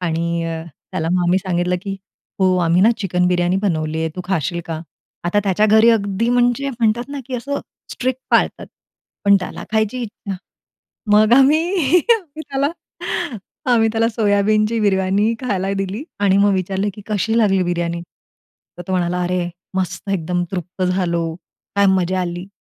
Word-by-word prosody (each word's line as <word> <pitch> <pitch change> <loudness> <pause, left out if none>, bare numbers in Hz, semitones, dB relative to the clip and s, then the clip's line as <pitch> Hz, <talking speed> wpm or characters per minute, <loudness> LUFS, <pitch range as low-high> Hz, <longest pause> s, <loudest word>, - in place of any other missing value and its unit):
आणि 170 0 -1
अ, 165 -1 -3 0.3
त्याला 165 -3 -1
मग 180 - +2
आम्ही 180 +2 +3
सांगितलं, 180 -1 0
की 195 -1 -4 0.4
"हो, 185 -1 +4
आम्ही 170 +2 +3
ना, 225 - +6
चिकन 180 -4 +1
बिर्याणी 175 +1 +2
बनवली 160 -4 -1
आहे, 160 - 0
तू - - -3
खाशील 170 -2 -1
का?" 160 -1 -4 0.4
आता 175 +4 +1
त्याच्या 200 +2 +3
घरी 220 +2 +6
अगदी 205 +1 +1
म्हणजे 245 +2 +2
म्हणतात 235 0 0
ना, 285 0 -5
की 260 - -5
असं 280 +4 -3 0.3
स्ट्रिक्ट 255 0 -2
पाळतात. - - +2 0.6
पण 200 0 +6
त्याला - - -6
खायची 220 +3 +1
इच्छा. 205 -3 -6 0.8
मग 215 +2 +5
आम्ही 285 +4 +5 0.5
आम्ही 315 -8 -7
त्याला 275 0 0 1.1
आम्ही 225 -2 +4
त्याला 225 0 +2
सोयाबीनची 215 0 +2
बिर्याणी 200 +1 +2
खायला 195 -6 -1
दिली 195 +6 -3 0.2
आणि 195 -1 +4
मग 200 0 +4
विचारलं 190 +2 -1
की 210 - -10
"कशी 220 +1 0
लागली 195 -4 +3
बिर्याणी?" 170 -1 -1 0.8
तर - - -5
तो - - -1
म्हणाला, 180 0 0
"अरे, 180 0 -1 0.3
मस्त 185 0 -3
एकदम 180 0 -1
तृप्त 185 +1 -4
झालो, 170 -3 0 0.4
काय 200 0 +5
मजा 185 -1 +1
आली." 175 +1 -4
195 Hz, 160 wpm, -19 LUFS, 180-220 Hz, 1.1 s, ना